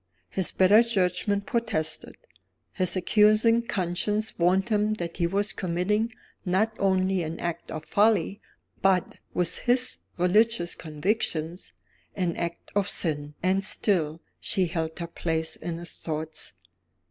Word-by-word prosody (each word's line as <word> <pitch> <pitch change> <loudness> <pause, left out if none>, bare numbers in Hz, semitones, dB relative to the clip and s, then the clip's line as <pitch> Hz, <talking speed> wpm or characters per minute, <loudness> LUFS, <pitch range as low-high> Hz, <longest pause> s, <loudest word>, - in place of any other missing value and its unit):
His 190 -2 +2
better 200 +4 +6
judgment 200 -2 0
protested; 220 -10 -2 0.6
his 185 -1 +1
accusing 215 +4 +4
conscience 210 +1 -1
warned 185 +4 +3
him 215 0 +2
that 170 -4 -5
he 170 - +2
was 200 +3 0
committing, 195 +6 0 0.3
not 195 +4 +1
only 190 -1 +2
an 165 0 -4
act 170 -1 -4
of 155 0 -6
folly 210 -1 +2 0.4
but 190 -2 +2 0.2
(with 175 -2 +1
his 250 +1 +1 0.2
religious 185 +1 +3
convictions) 165 +1 -2 0.4
an 180 -3 -1
act 170 0 -5
of 205 -1 +2
sin 150 -5 0
and 190 +1 +2
still 165 -6 +1 0.2
she 190 - +1
held 160 -2 -3
her 170 - -3
place 160 -1 -2
in 165 0 -5
his 175 0 -5
thoughts. 155 -3 -4
185 Hz, 130 wpm, -27 LUFS, 170-210 Hz, 0.6 s, better